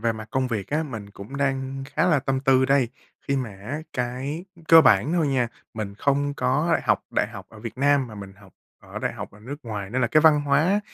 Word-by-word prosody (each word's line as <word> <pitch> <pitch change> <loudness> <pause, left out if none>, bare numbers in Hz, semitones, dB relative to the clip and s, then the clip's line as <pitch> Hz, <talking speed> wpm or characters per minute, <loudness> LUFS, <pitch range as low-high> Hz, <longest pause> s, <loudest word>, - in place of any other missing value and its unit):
về 115 0 +1
mặt 110 -1 -8
công 130 -1 0
việc 110 -5 -3
á, 150 +2 0
mình 110 -9 -7
cũng 100 +7 -9
đang 135 -1 -2
khá - - +2
là 155 -5 +4
tâm 135 0 -1
tư 130 -1 +4
đây 135 -2 +3 0.4
khi 140 - +2
mà 125 -5 -2
á 105 +10 -6
cái 130 +7 -3 0.2
cơ 165 0 +10
bản 125 - +4
thôi 170 -3 +2
nha, 125 -3 +1 0.3
mình 105 -3 -5
không 140 +4 0
có 145 +6 +1
học 105 -5 +2
đại 105 - 0
học 100 -5 -10
ở 110 - -14
Việt 115 +3 -8
Nam 140 -1 +3
mà 110 - -10
mình 100 -2 -9
học 95 -1 -19 0.3
ở - - -8
đại - - -2
học - - -7
ở 105 - -17
nước 135 +6 -7
ngoài 105 -4 -5
nên 130 - -1
là 115 - +3
cái 155 +6 +4
văn 155 -2 +6
hóa 150 +8 +2
130 Hz, 240 wpm, -24 LUFS, 110-145 Hz, 0.4 s, cơ